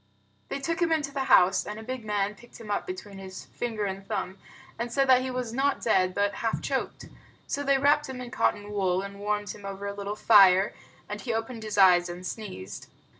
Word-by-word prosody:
They - - -3
took 330 +5 -2
him 335 -1 +2
into 300 -3 0
the 275 -1 -2
house, 185 -6 +5
and 210 +1 -6
a - - -8
big 255 0 -5
man 205 -1 -1
picked 240 +4 -16
him 215 -2 -7
up 200 - -1
between 195 +2 -7
his 190 -1 -9
finger 225 -3 -3
and 195 0 -4
thumb 195 -2 -4 0.4
and 235 0 -3
said 275 +2 +2
he 260 - -3
was 250 -3 -3
not 275 +2 +1
dead 185 -5 +2
but 205 0 +1
half 225 -1 0
choked. - - -3 0.4
So 285 - -3
they 275 -1 +3
wrapped 290 +1 +3
him 260 -1 -6
in 245 -1 -7
cotton 205 0 0
wool, 190 -2 0
and 200 0 -8
warmed 205 0 -2
him 205 - -11
over 195 0 -6
a 200 - -3
little 200 +1 -4
fire, 195 -3 +6 0.3
and 210 0 -5
he 240 - -3
opened 225 +1 -4
his 215 -1 -5
eyes 180 -2 +6
and 175 +1 -7
sneezed. 180 - -7
210 Hz, 220 wpm, -27 LUFS, 195-250 Hz, 0.4 s, fire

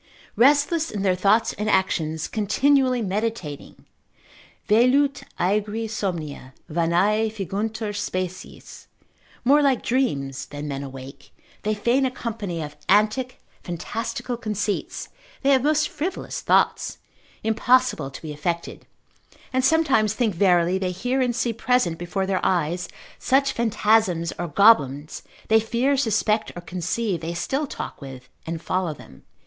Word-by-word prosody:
Restless 290 +5 +3
in 205 -2 -4
their 190 -2 +3
thoughts 200 +5 +2
and 210 +1 -3
actions, 160 -5 0
continually 255 +4 +2
meditating, 200 -7 -4 0.8
Velut 260 +6 +3 0.2
aegri 210 +4 0
somnia, 165 - -4
vanae 175 +7 +2
finguntur 215 +2 -3
species; 185 -2 -5 0.6
more 285 +4 +5
like 275 -4 +2
dreams, 140 - -1
than 145 +1 -6
men 140 -1 -4
awake, 135 0 -10 0.3
they 215 +1 -1
fain 240 +6 +2
a 260 - +2
company 210 -9 -4
of 150 0 -8
antic, 215 +6 +2 0.2
fantastical 230 +7 -4
conceits, 210 -3 -3 0.3
they 275 - +4
have 265 -2 +5
most 300 +2 +2
frivolous 345 +6 -4
thoughts, - - +2 0.5
impossible 225 - +2
to 135 - -11
be 155 -2 -5
effected; 170 +3 -4 0.7
and 260 0 +1
sometimes 265 -9 +3
think 225 -4 +1
verily 180 0 +3
they 185 -1 -1
hear 245 +9 -1
and 245 -2 +1
see 240 -2 0
present 225 -8 +1
before 185 +2 -2
their 190 -1 -1
eyes 175 0 0 0.3
such 275 +1 +2
phantasms 215 -6 +1
or 175 - -2
goblins, 150 - +3 0.3
they 220 0 +5
fear, 240 +5 +1
suspect, 220 -4 +1
or 175 - -6
conceive, 180 +2 -2
they 165 +1 -4
still 275 - -1
talk - - -7
with, 130 -2 -10 0.2
and 165 0 -4
follow 180 -2 -1
them. 65 - -15
210 Hz, 130 wpm, -23 LUFS, 170-240 Hz, 0.8 s, more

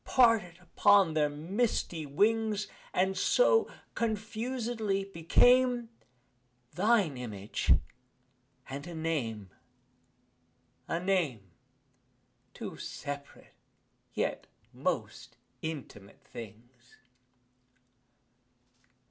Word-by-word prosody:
Parted 225 -9 +3
upon 195 -1 +4
their 150 -1 +2
misty 165 0 -1
wings, 210 +6 +1 0.3
And, 190 +1 +1
so, 475 - +3 0.2
confusedly, 220 -1 -2
became 240 +7 +3 0.8
Thine 195 - +2
image, 105 -5 0 0.9
and 140 +4 -6
a 175 - -7
name 120 - -3 1.4
a 165 - -1
name! 160 - -1 1.0
Two - - -7
separate 140 0 -7 0.6
yet - - -2 0.3
most - - -3 0.2
intimate 135 -11 -7
things. 120 +3 -12
180 Hz, 70 wpm, -31 LUFS, 140-220 Hz, 1.4 s, upon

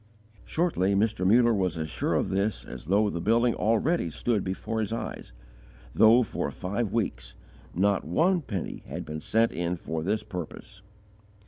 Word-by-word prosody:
Shortly 100 - +1
Mr. 100 -2 +1
Muller 120 +3 +5
was 90 -5 0
as 80 -1 -2
sure - - -1
of - - 0
this 100 +2 -1
as 65 -1 -9
though 100 +3 +2
the 85 - -4
building 115 +3 +3
already 115 - +1
stood 105 +5 -1
before 105 +4 -3
his 110 -2 -2
eyes, 115 - -5 0.6
though 115 +3 +6
for 110 - -3
five 100 +3 -3
weeks - - -2 0.4
not 100 +2 +2
one 175 - +2
penny 100 - -5
had - - -5
been 75 0 -6
sent 115 +6 +2
in 85 +1 -2
for 80 -1 -4
this 105 +6 -1
purpose. 100 0 -8
100 Hz, 160 wpm, -27 LUFS, 90-115 Hz, 0.6 s, though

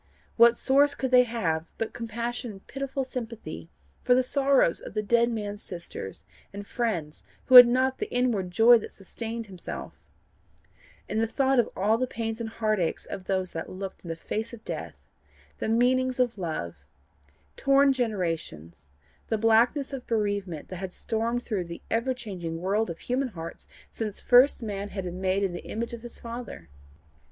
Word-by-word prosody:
What 235 0 +6
source 285 +2 +3
could 260 -2 -2
they 250 0 +7
have 170 -9 -1
but 225 - -3
compassion 235 +1 -4
and 195 -2 -11
pitiful 275 0 -3
sympathy 230 - -7 0.3
for 245 - +4
the 255 - +3
sorrows 270 - +3
of - - -10
the 215 - 0
dead 235 +2 +3
man's 205 -3 -4
sisters 170 - -7 0.3
and 200 0 -7
friends 200 -11 -3 0.2
who - - -1
had 245 -1 +13
not 260 +2 +1
the - - -4
inward 240 -7 +1
joy 230 +5 +6
that - - -9
sustained 225 +4 -6
himself, 185 -4 -7 1.1
and 220 - -1
the 225 - +1
thought 270 +2 +2
of 235 - +2
all 215 +4 +2
the 255 - 0
pains 225 -1 -4
and 225 - -3
heartaches 215 -6 -1
of 185 - -7
those 185 -1 -1
that 165 - -5
looked 190 0 -7
in - - -10
the 165 - -2
face 220 +7 -4
of 220 - -19
death - - -7 0.5
the - - -2
meanings 255 +2 +2
of 240 -4 +1
love 85 - -4 0.7
torn 275 0 +4
generations, 165 - -3 0.4
the 220 - 0
blackness 230 +6 +3
of 260 -2 -6
bereavement 205 -7 -2
that 185 - -6
had 185 0 -6
stormed 230 +2 -2
through 195 -6 -2
the 170 0 -9
ever 245 +3 +1
changing 180 -9 -5
world 200 +5 0
of 165 - -5
human 255 +2 -1
hearts 165 -7 -8 0.2
since 215 -3 -3
first 250 +1 +5
man 205 -2 -4
had 195 -2 -5
been 180 +1 -6
made 190 +1 +1
in 190 -3 0
the 175 - -7
image 230 +2 -4
of 235 - -6
his 240 0 -8
Father? 230 - -8
225 Hz, 175 wpm, -27 LUFS, 185-245 Hz, 1.1 s, had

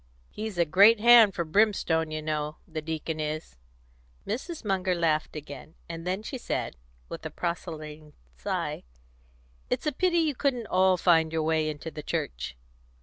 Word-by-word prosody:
He's 215 -3 -5
a 170 - +3
great 200 +8 +6
hand 230 -3 +7
for 170 - -1
brimstone, 165 -3 +2
you 155 0 -4
know, 150 0 -2
the 160 -2 -5
deacon 160 0 -4
is." 155 - -4 0.7
Mrs. 260 - -5
Munger 190 -2 +1
laughed 160 -3 0
again, 150 +1 -9
and 165 +1 -7
then 190 +3 -1
she 260 +3 -5
said, - - -3 0.3
with - - -8
a - - -4
proselyting 155 -3 -5 0.2
sigh, 65 - -3 0.9
"It's - - -1
a 300 - +2
pity 350 +4 +1
you 320 -3 +2
couldn't 250 -3 -1
all 185 -1 +3
find 165 -3 +3
your 160 -1 0
way 155 -1 +1
into 155 +2 -6
the 155 - -7
Church." 60 - -4
165 Hz, 160 wpm, -27 LUFS, 155-210 Hz, 0.9 s, hand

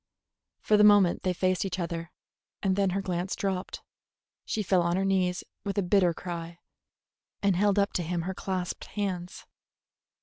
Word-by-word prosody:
For 210 - +3
the 210 - +6
moment 205 -4 +6
they 185 - 0
faced 185 +2 +1
each 190 -2 -3
other, 170 -1 -4 0.5
and 190 -2 +2
then 200 -1 +2
her 195 +2 -2
glance 180 0 -2
dropped. 190 -1 -3 0.6
She 215 - -2
fell 185 -1 +3
on 170 0 +1
her 190 +1 0
knees 185 -2 +1 0.2
with 200 0 -3
a 200 - +2
bitter 180 -1 +3
cry, 170 -1 -6 0.9
and 200 -2 +3
held 200 +2 +2
up 200 0 +2
to - - 0
him 170 0 -2
her 190 +2 -3
clasped 185 -1 -4
hands. 185 -3 -4
185 Hz, 170 wpm, -28 LUFS, 175-195 Hz, 0.9 s, the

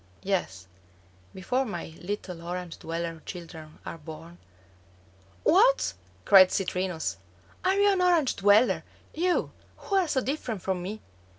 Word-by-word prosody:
Yes, 175 - -2 0.7
before 250 +8 -1
my 175 -9 -6
little 180 -2 -5
Orange 175 0 -6
dweller 165 0 -4
children 165 -3 -9
are 165 - -6
born 160 +3 -11 0.5
" 95 0 -30
"What," 475 +8 +4 0.3
cried 190 -2 +8
Citrinus, 185 -3 -2 0.5
"are 375 +1 +3
you 405 0 +4
an 375 - 0
Orange 345 -7 +3
dweller; 205 +4 +4 0.3
you, 355 +2 0 0.3
who 400 - -3
are 370 -3 +2
so 280 - +1
different 250 - -3
from 190 -2 -1
me?" 205 +5 -6
185 Hz, 130 wpm, -27 LUFS, 165-260 Hz, 0.7 s, cried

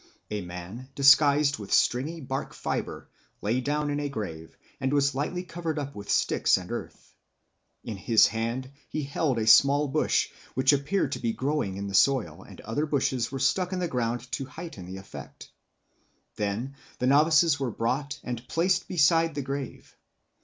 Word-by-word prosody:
A 105 -1 -2
man, 90 +8 -8
disguised 140 0 +5
with 100 -2 -8
stringy 150 +7 +2
bark 135 0 -4
fibre, - - -4 0.3
lay 115 +5 0
down 145 +2 -1
in 145 - -1
a 145 -1 -2
grave 80 -11 -6 0.2
and 130 0 -1
was 140 -1 +2
lightly 150 +7 -2
covered 165 -2 -4
up 140 -1 -4
with 100 0 -9
sticks - - +3
and - - -8
earth. - - -7 0.7
In 110 -3 -5
his 110 +3 +5
hand 115 +4 -2 0.2
he 155 - -3
held 140 -1 -1
a 110 - 0
small 140 +5 +6
bush, 135 - +1 0.3
which 130 +2 +4
appeared 145 +2 0
to - - -3
be 115 -1 -1
growing 130 -9 -2
in 100 - -4
the 100 - -5
soil, 100 - +2
and - - -13
other 130 +8 -2
bushes 130 -4 0
were 135 - -3
stuck 180 +8 +1
in - - -1
the 180 -1 -1
ground 120 -4 -1
to 135 - -2
heighten 135 - -9
the 95 +1 -7
effect. 75 -7 -11 0.8
Then 105 +6 -3 0.2
the 125 - -1
novices 150 +2 +4
were 135 -3 -1
brought 135 +6 -2
and 120 0 -5
placed 180 +2 +1
beside 165 -1 +3
the 145 - -2
grave. 135 0 -6
135 Hz, 175 wpm, -27 LUFS, 115-150 Hz, 0.8 s, small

